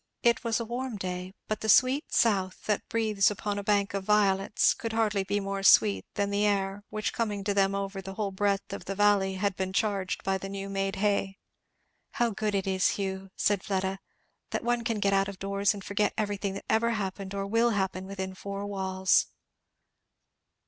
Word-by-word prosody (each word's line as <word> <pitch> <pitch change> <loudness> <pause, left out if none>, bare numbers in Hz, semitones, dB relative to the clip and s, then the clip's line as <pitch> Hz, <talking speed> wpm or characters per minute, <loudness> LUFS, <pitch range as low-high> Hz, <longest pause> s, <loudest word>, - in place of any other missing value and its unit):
It 235 -1 +3
was 230 -1 0
a 230 - -3
warm 240 0 -4
day, 185 0 -5
but 215 - -2
"the 220 - -2
sweet 260 +8 +4
south 190 -5 +1
that 210 -2 -1
breathes 215 -4 +2
upon 205 0 -3
a - - -5
bank 200 -1 +1
of 195 -1 -2
violets," 200 -1 +3
could 230 -1 -5
hardly 215 -3 +1
be 200 +2 -1
more 195 0 -3
sweet 105 - +5
than 200 0 0
the 200 +1 +1
air 200 -1 0
which 215 0 -2
coming 210 -4 -2
to 200 0 0
them 195 0 +2
over 195 0 -3
the 195 +1 -8
whole 205 -1 -2
breadth 200 0 -1
of - - -6
the 195 - -4
valley 200 -1 +3
had 195 0 -1
been 190 0 -3
charged 195 -3 -1
by 190 0 0
the 195 - -6
new 195 0 -5
made 195 0 -1
hay. 200 -1 0 0.8
"How 240 -1 +1
good 210 0 -2
it 195 - 0
is, 190 -1 +1
Hugh," 190 -1 -4
said 205 -2 +1
Fleda, 190 -1 -1 0.5
"that - - -3
one 240 0 0
can 230 -2 -1
get 200 -1 +2
out 195 0 +3
of 200 -1 -7
doors 200 +1 +1
and 200 -2 -6
forget 205 +1 0
everything 205 -2 -2
that - - -7
ever 230 +1 +2
happened 195 -2 -4
or 200 - -2
ever - - -2
will 230 +4 +2
happen 190 -3 -1
within 190 -1 -5
four 200 +1 -5
walls!" 190 -2 +1
200 Hz, 205 wpm, -28 LUFS, 195-210 Hz, 0.8 s, sweet